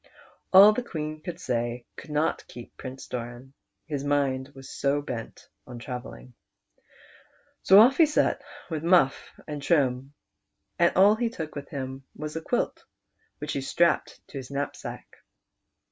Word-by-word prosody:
All 200 +3 +9
the 250 - -1
Queen 155 -8 -5
could 170 +1 -6
say 120 -4 -2
could - - -11
not 150 +1 0
keep 120 -1 -11
Prince 130 0 -8
Doran, 120 +2 -7 0.3
his 145 -3 -4
mind 140 -2 0
was 135 0 -11
so 140 +2 0
bent 125 -6 -7 0.2
on 125 -2 -8
travelling. 65 - -8 1.3
So 190 - +7
off 255 +7 +6
lie 325 - +9
set 300 - +1 0.3
with 155 -2 -2
Mufif 170 -5 +2
and 150 -2 -5
Trim, 135 -3 +1 0.6
and 170 0 +5
all 200 +3 +7
he 230 +1 0
took 160 -8 -6
with 145 - -7
him 135 -1 -5
was 150 0 -6
a 160 - -3
quilt, - - -1 0.5
which 150 0 -4
he 140 - -2
strapped 170 +4 0
to - - -8
his 130 - -9
knapsack. 140 0 -6
145 Hz, 150 wpm, -27 LUFS, 130-165 Hz, 1.3 s, All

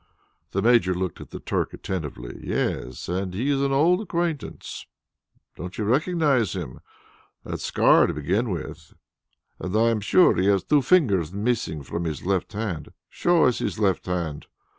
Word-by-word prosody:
The 100 - -1
Major 115 -6 +4
looked 90 -2 -3
at - - -10
the - - -7
Turk - - -2
attentively. 75 -10 -5
"Yes, 60 +1 -3
and 90 +1 -2
he 130 +8 0
is 140 - +2
also 140 - +1
an - - -2
old 170 +8 +3
acquaintance. 170 -6 -4 0.7
Don't 90 +2 -7
you 110 - -1
recognize 140 - +2
him. 75 -10 -6 0.6
That - - -5
scar - - +4
to - - -2
begin 95 - 0
with, 85 -5 -6 0.6
and 95 +2 -4
I 115 +1 +4
am 110 -2 -1
sure 175 - +5
he 90 +3 +1
has 100 -2 +3
two 150 -1 +3
fingers 110 - +3
missing 100 -8 -1
from 85 +6 -4
his 80 -1 -4
left 95 +2 -1
hand. 100 -8 -4 0.2
Show 175 -1 +2
us 125 - +2
his - - -2
left 100 -4 0
hand." 85 -5 -3
100 Hz, 170 wpm, -24 LUFS, 90-130 Hz, 0.7 s, sure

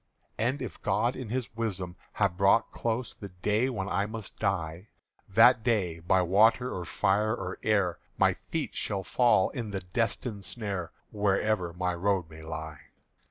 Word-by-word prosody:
"And 130 +5 0
if 125 - -7
God 110 +5 +1
in 125 -4 -6
His 125 -1 -3
wisdom 95 -6 -3 0.2
have 100 -4 +1
brought 100 +4 +3
close 115 +1 -2
The 100 - -9
day 105 +7 0
when 100 -7 -3
I 100 +1 0
must 110 -1 -8
die, 90 -2 -2 0.4
That 115 +4 +6
day 95 -9 +1
by 90 +2 +2
water 110 +7 +4
or 90 - -4
fire 105 +7 +1
or 95 -4 -5
air 100 -5 +1 0.2
My - - +4 0.2
feet - - -2
shall 100 -1 -2
fall 120 -2 +3
in 115 -5 -4
the 95 -2 -3
destined 105 +2 -2
snare 100 -6 -3 0.2
Wherever 100 -3 +1
my 90 +1 -1
road 90 -2 0
may 80 0 -11
lie. 80 -2 -6
100 Hz, 160 wpm, -29 LUFS, 90-110 Hz, 0.4 s, That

